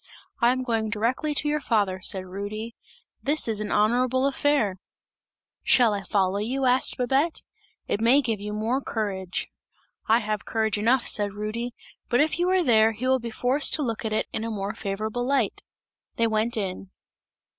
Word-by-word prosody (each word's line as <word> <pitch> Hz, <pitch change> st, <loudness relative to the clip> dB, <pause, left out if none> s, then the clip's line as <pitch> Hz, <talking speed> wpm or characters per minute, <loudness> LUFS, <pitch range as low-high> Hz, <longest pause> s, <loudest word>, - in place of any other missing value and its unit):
'I 235 Hz, +1 st, +5 dB
am 255 Hz, 0 st, -3 dB
going 225 Hz, -3 st, -1 dB
directly 245 Hz, +8 st, -1 dB
to 295 Hz, -, 0 dB
your 300 Hz, 0 st, 0 dB
father,' 200 Hz, -7 st, 0 dB
said 185 Hz, 0 st, 0 dB
Rudy, 205 Hz, +4 st, -6 dB, 0.5 s
'this 295 Hz, 0 st, +1 dB
is 215 Hz, -2 st, 0 dB
an 210 Hz, -, -4 dB
honourable 250 Hz, +5 st, +2 dB
affair!' 275 Hz, -8 st, +1 dB, 0.8 s
'Shall 240 Hz, -4 st, +4 dB
I 200 Hz, -, -2 dB
follow 190 Hz, +1 st, 0 dB
you?' 260 Hz, +6 st, -1 dB
asked 255 Hz, +1 st, +2 dB
Babette, 270 Hz, +6 st, 0 dB, 0.4 s
'it 205 Hz, -, -1 dB
may 240 Hz, +5 st, +5 dB
give 230 Hz, -6 st, -1 dB
you 210 Hz, 0 st, -5 dB
more 225 Hz, +6 st, -1 dB
courage!' 195 Hz, -7 st, -3 dB, 0.6 s
'I 225 Hz, -, +5 dB
have 215 Hz, -3 st, -3 dB
courage 220 Hz, -2 st, -1 dB
enough,' 235 Hz, +4 st, +2 dB
said 205 Hz, -2 st, +3 dB
Rudy, 225 Hz, +4 st, -4 dB, 0.3 s
'but 245 Hz, -, +2 dB
if 310 Hz, +2 st, +1 dB
you 355 Hz, +1 st, +2 dB
are 370 Hz, -1 st, +3 dB
there, 225 Hz, -4 st, +4 dB
he 225 Hz, +4 st, -5 dB
will 260 Hz, 0 st, +3 dB
be 235 Hz, -1 st, -5 dB
forced 255 Hz, +5 st, +2 dB
to 305 Hz, -, -1 dB
look 230 Hz, -3 st, -3 dB
at 220 Hz, -, -2 dB
it 215 Hz, -, 0 dB
in 220 Hz, -, -2 dB
a 230 Hz, -, -3 dB
more 200 Hz, -2 st, -3 dB
favourable 215 Hz, +4 st, -3 dB
light!' 260 Hz, -4 st, 0 dB, 0.5 s
They 230 Hz, -, +1 dB
went 225 Hz, +1 st, 0 dB
in. 195 Hz, -2 st, -4 dB
225 Hz, 180 wpm, -25 LUFS, 210-255 Hz, 0.8 s, I